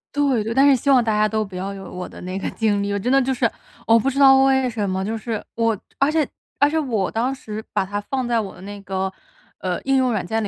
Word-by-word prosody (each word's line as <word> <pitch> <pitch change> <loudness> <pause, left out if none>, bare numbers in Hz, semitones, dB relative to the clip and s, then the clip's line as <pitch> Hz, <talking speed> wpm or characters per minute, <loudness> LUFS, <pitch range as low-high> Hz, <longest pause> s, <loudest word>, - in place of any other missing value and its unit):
对 275 -6 +2
对， 225 - -2
但 270 +3 +5
是 280 - +7
希 280 - -2
望 260 -3 +6
大 225 - 0
家 210 0 +3
都 215 0 -1
不 195 -3 -8
要 195 +2 -4
有 195 -1 -9
我 180 0 -6
的 - - -12
那 185 +2 -4
个 - - -3
经 210 -3 0
历， 200 0 -2
我 - - 0
真 240 +6 -1
的 275 - +5
就 265 +1 0
是 250 - +1 0.4
我 230 0 +5
不 265 - +1
知 275 - -5
道 270 -1 +7
为 265 -1 +3
什 215 -4 -2
么， 190 0 -1
就 220 +3 -2
是 220 -1 -4
我 230 -1 +1 0.2
而 275 - +4
且 310 -1 +2 0.3
而 285 - +4
且 320 +1 0
我 225 -10 -1
当 250 +4 -1
时 220 -4 -7
把 190 - +1
它 205 +2 -3
放 260 +5 -3
在 240 -1 +1
我 205 -3 -5
的 180 - -14
那 200 +1 -8
个， 190 0 -2 0.5
呃， 180 -1 -2
应 270 0 +1
用 255 -2 +2
软 210 - -2
件 225 +4 -1
里 210 - -2
225 Hz, 310 characters per minute, -21 LUFS, 200-265 Hz, 0.5 s, 是